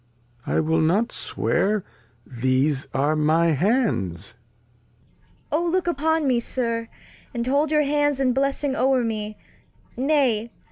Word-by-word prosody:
I - - +1
will 160 +1 +1
not 195 +9 +2
swear 210 0 0 0.4
These 130 +3 0
are 145 +3 +1
my 160 +2 +3
Hands. 155 - 0 1.2
Cord. 310 +4 +1
O - - 0
look 365 +1 0
upon 320 -1 +1
me. 250 -2 +3
Sir, 230 -1 -2 0.5
And 235 0 -1
hold 280 +4 +1
your 300 0 +3
Hands 290 -1 +1
in 260 -2 +2
Blessing 275 +1 0
over 260 -1 +2
me; 215 -2 -3 0.6
nay. 255 -5 +1
235 Hz, 130 wpm, -23 LUFS, -, 1.2 s, my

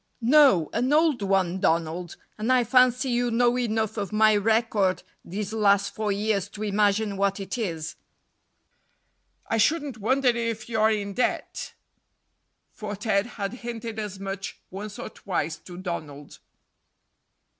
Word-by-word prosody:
"No, 255 - +5
an 250 +4 0
old 305 -5 +3
one, 190 -2 +1
Donald, 170 +1 0 0.2
and 220 +4 -1
I 255 -1 +4
fancy 250 +2 +3
you 245 0 +1
know 240 +1 +3
enough 220 -3 -1
of 200 -3 -3
my 215 0 +4
record 210 -2 +1 0.2
these 205 +3 -5
last 200 -2 +3
four 215 -1 -1
years 200 -1 0
to 210 +1 -7
imagine 205 0 +1
what 200 0 +1
it 195 -1 -4
is." 165 -9 -4 1.5
"I 225 - -1
shouldn't 285 0 +1
wonder 260 +5 +2
if 230 -2 -2
you're 220 -2 +2
in 205 -2 -2
debt," 250 - -2 1.0
for 210 -2 -6
Ted 205 0 0
had 200 +1 -3
hinted 230 -2 -5
as 205 -3 -5
much 195 0 -5
once 205 +2 -7
or - - -6
twice 170 -4 -3
to 175 +1 -12
Donald. 155 -6 -6
215 Hz, 140 wpm, -26 LUFS, 195-235 Hz, 1.5 s, No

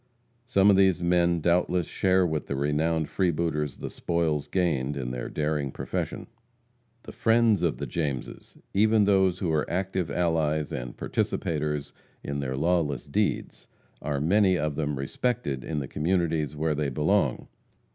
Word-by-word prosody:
Some 100 -5 +5
of - - +5
these 95 -2 +3
men 85 -1 +2
doubtless 90 +1 +2
share 95 +3 +2
with 80 -3 -2
the 70 - -2
renowned 75 +3 0
freebooters 80 -5 -1
the - - -5
spoils 80 -4 -1
gained 75 -7 0
in 60 -2 -3
their 60 -1 -4
daring 75 -2 -1
profession. - - -4 0.8
The - - -9
"friends" 115 -2 +3
of 85 -3 0
the - - -4
Jameses 65 -7 -4 0.2
even 110 +2 +4
those 95 -3 +3
who 90 -3 -1
are 75 -1 0
active 95 -1 -1
allies 80 -3 0
and - - -5
participators 75 -2 -2 0.3
in 70 0 -3
their 65 -1 -3
lawless 80 -4 0
deeds, - - -2 0.3
are 70 -1 -2
many 95 +4 +3
of 75 -1 -1
them 75 -1 -2
respected 70 - -2
in 80 - -4
the 70 -3 -2
communities 80 -2 0
where 80 +1 0
they 75 -1 -1
belong. 75 +2 +1
80 Hz, 150 wpm, -27 LUFS, 75-90 Hz, 0.8 s, Some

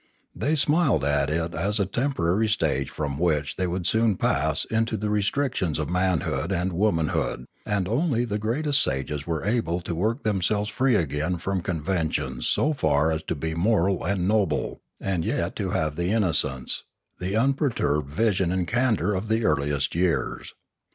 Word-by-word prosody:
They 155 +3 0
smiled 145 - +3
at 70 0 +1
it 85 +2 -1
as 105 +3 0
a 100 - +2
temporary 105 -3 0
stage 75 -10 0
from 70 -2 -4
which 75 -3 0
they 95 - -1
would 90 0 -3
soon 110 -1 +2
pass 75 +2 +1
into 110 0 0
the 105 +1 -2
restrictions 105 - 0
of 80 +1 -3
manhood 90 -4 0
and 90 0 0
womanhood; 85 -9 0 0.2
and 100 -3 0
only 120 - +1
the 105 -2 -2
greatest 140 +6 +1
sages 70 +3 -2
were 80 0 -2
able 105 -6 0
to 85 - -4
work 110 - -1
themselves 105 0 0
free 130 +1 +2
again 80 0 0
from 95 +2 -2
conventions 80 -7 -2
so 155 - +2
far 80 - +2
as 80 0 -1
to - - -2
be 80 +2 -3
moral 95 0 +1
and 90 0 0
noble 100 -7 0 0.2
and 95 -4 -1
yet - - -1
to - - -2
have 75 -1 -1
the 85 +3 -1
innocence, 75 - +1 0.4
the 95 +3 -2
unperturbed 115 - +1
vision 95 -1 +1
and 90 -1 -1
candour 115 -4 +1
of 95 +3 -3
the 110 +1 +1
earliest 70 -2 +1
years. 85 0 -1
90 Hz, 165 wpm, -25 LUFS, 80-110 Hz, 0.4 s, smiled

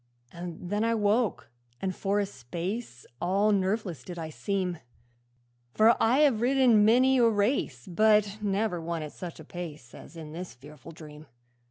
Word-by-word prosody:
'And 175 +1 -7
then 210 +1 +1
I 230 0 +2
woke, 210 - 0 0.3
and 185 -2 -3
for 200 +1 0
a 205 - +1
space 170 - -6 0.2
All 200 +4 +2
nerveless 190 - -1
did 175 +5 -8
I 160 -1 -5
seem; 185 -1 -2 1.0
For 225 +2 +6
I 250 +6 +4
have 265 -8 +3
ridden 245 -4 +4
many 255 +4 +4
a 235 -1 +5
race, 205 - 0
But 210 +2 +2
never 200 -3 -1
one 165 -1 -3
at 150 - -7
such 175 -3 -8
a 160 - -11
pace 155 -8 -8
As 165 - -12
in 155 -2 -8
that 175 +3 -6
fearful 150 +4 -13
dream. 155 -1 -12
190 Hz, 165 wpm, -28 LUFS, 165-215 Hz, 1.0 s, For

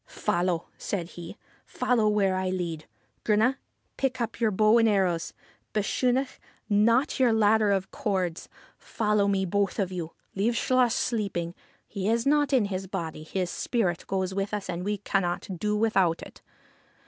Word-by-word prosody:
' - - -50 0.2
Follow! 175 -1 +1
' - - -37
said 175 -4 -2
he; 170 -2 -9 0.2
' - - -32
follow 225 -4 +1
where 200 -3 +2
I 185 0 -1
lead. 170 -4 -3 0.4
Grunne, 225 +5 +3 0.4
pick 260 -2 -1
up 235 -1 -3
your 230 -2 +3
bow 215 +3 +4
and 225 -1 +4
arrows; 185 -5 +1 0.4
Bechunach, 250 +5 0 0.3
knot 230 +8 +3
your 250 -3 +4
ladder 220 -1 +4
of 195 -1 -1
cords. 190 - -2 0.3
Follow 210 -2 0
me, 195 -1 +1
both 200 +1 0
of 190 -4 -1
you. 170 -3 -5 0.2
Leave 220 +5 0
Chluas 250 -1 +2
sleeping: 200 -8 -1 0.3
he 200 -1 -2
is 230 +1 +1
not 290 0 +3
in 255 -6 +3
his 190 -1 -4
body; 170 -5 -4
his 175 +3 -3
spirit 190 -9 -1
goes 190 -1 -1
with 195 +2 -2
us, 200 -3 -4
and 175 +1 -4
we 205 +2 -1
cannot 195 -3 -1
do 210 +2 0
without 195 -6 +2
it.' - - -13
200 Hz, 170 wpm, -27 LUFS, 185-225 Hz, 0.4 s, bow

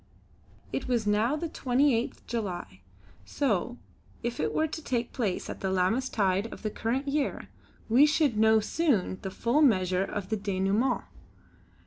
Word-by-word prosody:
It - - -2
was 240 -3 0
now 215 +6 +2
the 330 +2 -3
28th 255 -4 0
July 185 - -4 0.4
so, 240 - -1 0.5
if 240 0 -3
it - - 0
were 315 - +1
to 315 0 -6
take 240 -4 -2
place 210 -8 -2
at - - -6
the 190 - -2
Lammas 190 +8 +1
tide 195 +1 0
of - - -10
the 215 - -2
current 255 +7 -2
year, 285 0 -1 0.4
we 255 +7 +6
should 295 -5 +2
know 220 +1 +5
soon 215 - 0
the 190 - -4
full 235 +9 +1
measure 185 - +3
of 195 -1 -5
the 220 - 0
denouêment. 200 +5 0
230 Hz, 155 wpm, -28 LUFS, 195-265 Hz, 0.5 s, we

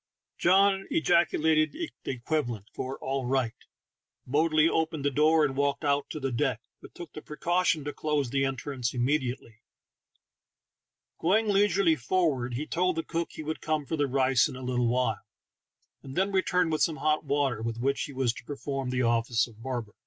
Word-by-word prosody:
John 195 +2 +4
ejaculated 160 -1 +2
the 335 0 -5 0.2
equivalent 120 -5 -2
for 130 +1 -4
"all 135 -1 -2
right," 130 -3 0 0.7
boldly 155 +3 +3
opened 160 -3 -1
the 145 - +2
door, 155 +3 +4
and 135 -2 -2
walked 140 +1 0
out 140 0 +1
to 155 - -5
the 135 -2 -2
deck, 125 -2 0 0.2
but - - -14
took 175 -3 -9
the 155 - -8
precaution 170 +1 0
to 145 +1 -4
close 150 -5 -1
the 135 0 +1
entrance 135 -2 -3
immediately. 125 -3 -1 1.6
Going 210 +6 +2
leisurely 195 -4 +3
forward, 130 -4 0
he 145 +5 -3
told 180 +2 0
the 165 - -2
cook 170 -1 -3
he 155 - -7
would 155 +1 -4
come 155 -2 -1
for 160 - -2
the 145 -2 +1
rice 130 -2 +3
in - - -8
a 130 - -8
little 125 -1 0
while, 115 -4 0 0.8
and 135 0 -10
then 195 +2 +1
returned 180 -3 +1
with 155 -1 0
some 160 0 +2
hot 155 0 +1
water, 140 -6 0
with 115 0 -3
which 135 +3 0
he - - -9
was 130 -3 0
to - - -11
perform 135 -1 -4
the 125 0 0
office 115 -1 +2
of 115 -2 -16
barber. 120 -4 -4
145 Hz, 180 wpm, -28 LUFS, 125-160 Hz, 1.6 s, John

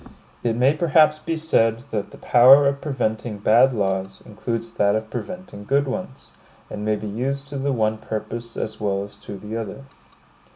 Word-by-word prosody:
It 115 -1 0
may 130 +4 +4
perhaps 155 -1 +3
be 165 +1 -3
said 115 -8 +1
that 105 -2 -2
the - - -13
power 135 +4 +7
of 140 0 -1
preventing 120 -6 -2
bad 110 +6 +5
laws 95 -3 -2
includes 115 +2 -4
that 100 -2 +2
of 110 0 -3
preventing 180 - -7
good 140 +5 +1
ones; 135 0 -6 0.4
and 105 - -5
may 110 0 +1
be 105 - -7
used 135 +7 -3
to 140 -1 -5
the 140 +1 0
one 110 -3 0
purpose 115 +2 -6
as 110 - -4
well 100 -2 -1
as 100 0 -11
to 100 -1 -9
the 105 +3 -7
other. 115 +4 -5
115 Hz, 180 wpm, -22 LUFS, 105-140 Hz, 0.4 s, power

